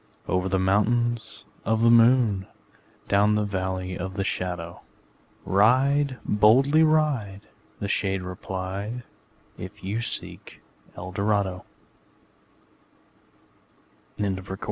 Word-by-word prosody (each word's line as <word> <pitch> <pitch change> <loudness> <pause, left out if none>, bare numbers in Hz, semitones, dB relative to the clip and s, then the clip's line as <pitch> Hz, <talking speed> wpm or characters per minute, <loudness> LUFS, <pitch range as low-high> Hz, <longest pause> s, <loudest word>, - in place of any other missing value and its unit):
'' - - -33
Over 90 +1 0
the 95 - +1
Mountains 115 +5 0 0.2
Of 110 +1 +1
the 115 - +6
Moon, 115 -4 +4 0.6
Down 105 +1 +3
the 105 - +1
Valley 95 -2 -3
of 95 +2 -5
the 100 - -1
Shadow, 90 -3 -4 0.6
Ride, 130 +7 +3
boldly 130 +9 +4
ride,'' 145 -11 +1 0.3
The 100 - -3
shade 95 -2 -1
replied, 95 +5 -5 0.6
``If 100 +3 -9
you 105 +5 -2
seek - - -5 0.3
for - - -8
Eldorado!'' 100 0 -1
100 Hz, 100 wpm, -25 LUFS, 95-120 Hz, 0.6 s, the